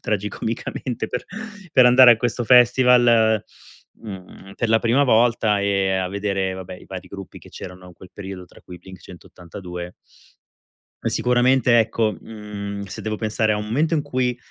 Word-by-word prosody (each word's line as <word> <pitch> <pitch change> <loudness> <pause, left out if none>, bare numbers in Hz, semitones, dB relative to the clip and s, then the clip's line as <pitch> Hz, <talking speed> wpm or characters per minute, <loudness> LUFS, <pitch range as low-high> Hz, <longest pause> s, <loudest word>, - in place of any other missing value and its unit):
tragicomicamente 110 +3 -4
per 125 - -5 0.5
per 130 -5 +6
andare 125 0 +8
a 115 - 0
questo 120 0 -2
festival, 120 -3 +4 0.6
mhmm, 95 -2 -11
per 120 - -1
la 110 0 +4
prima 120 +5 +2
volta, 115 -4 +2
ehm, 95 -1 0
a 90 - -3
vedere 95 -1 -2
vabbè 95 0 -8
i - - -15
vari 95 -1 -9
gruppi 100 -1 -10
che - - -17
c'erano 90 0 -11
in 90 - -13
quel 90 +2 -15
periodo, 95 -2 -8
tra - - -19
cui 90 - -12
i - - -15
Blink-182. 90 -1 -10 1.1
E - - -1
sicuramente, 125 0 +3
ecco, 110 -1 0
mhmm, 100 -2 -7
se 95 -1 -8
devo 110 0 -3
pensare 110 0 0
a 105 - 0
un 105 - -5
momento 150 +10 0
in 155 - +1
cui 130 -4 -2
105 Hz, 165 wpm, -21 LUFS, 95-120 Hz, 1.1 s, andare